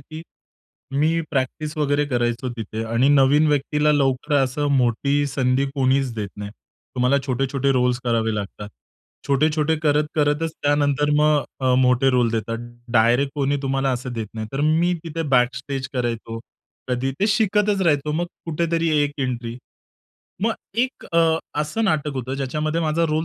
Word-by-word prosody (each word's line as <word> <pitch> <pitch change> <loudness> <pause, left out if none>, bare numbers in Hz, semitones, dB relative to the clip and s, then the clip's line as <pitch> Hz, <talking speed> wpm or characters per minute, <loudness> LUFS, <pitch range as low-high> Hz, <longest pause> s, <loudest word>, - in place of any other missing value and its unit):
की 155 +1 -7 0.8
मी 160 +2 +2
प्रॅक्टिस 150 +3 -2
वगैरे 145 -1 +1
करायचो 120 -1 -1
तिथे 110 0 -5
आणि 115 +4 +2
नवीन 145 +2 +5
व्यक्तीला 150 +1 +2
लवकर 135 0 +1
असं 140 +2 0
मोठी 140 +4 +1
संधी 135 0 +1
कोणीच 135 -1 +1
देत 105 -3 -4
नाही. 105 0 -6 0.5
तुम्हाला 125 +2 +3
छोटे-छोटे 135 +1 0
रोल्स 125 -1 +1
करावे 115 -2 +1
लागतात. 105 0 -6 0.6
छोटे-छोटे 155 +3 +2
करत-करतच 150 +1 +1
त्यानंतर 145 0 +2
मग 150 -3 +3 0.2
अ, 130 -1 +2
मोठे 125 +1 +3
रोल 125 -2 +2
देतात. 115 0 -2 0.3
डायरेक्ट 120 +4 +3
कोणी 145 -1 0
तुम्हाला 135 0 0
असं 125 0 -4
देत 115 -2 -4
नाही. 110 -1 -4
तर 135 - -2
मी 165 +4 +2
तिथे 165 0 -4
बॅकस्टेज 130 +2 0
करायचो. 115 -2 -3 0.5
कधी 125 +1 -1
ते 205 - +3
शिकतच 210 -1 +2
राहायचो. 150 -3 +1
मग 170 +3 -1 0.2
कुठेतरी 165 +1 0
1 145 0 -1
एंट्री, 120 -3 -3 0.9
मग 225 +1 +2 0.3
एक 255 +2 -1
अ, 170 - +3 0.4
असं 155 +10 -1
नाटक 155 -6 0
होतं 130 0 -3
ज्याच्यामध्ये 150 +4 -2
माझा 160 +1 +1
रोल 155 +1 0
140 Hz, 145 wpm, -22 LUFS, 125-150 Hz, 0.9 s, नवीन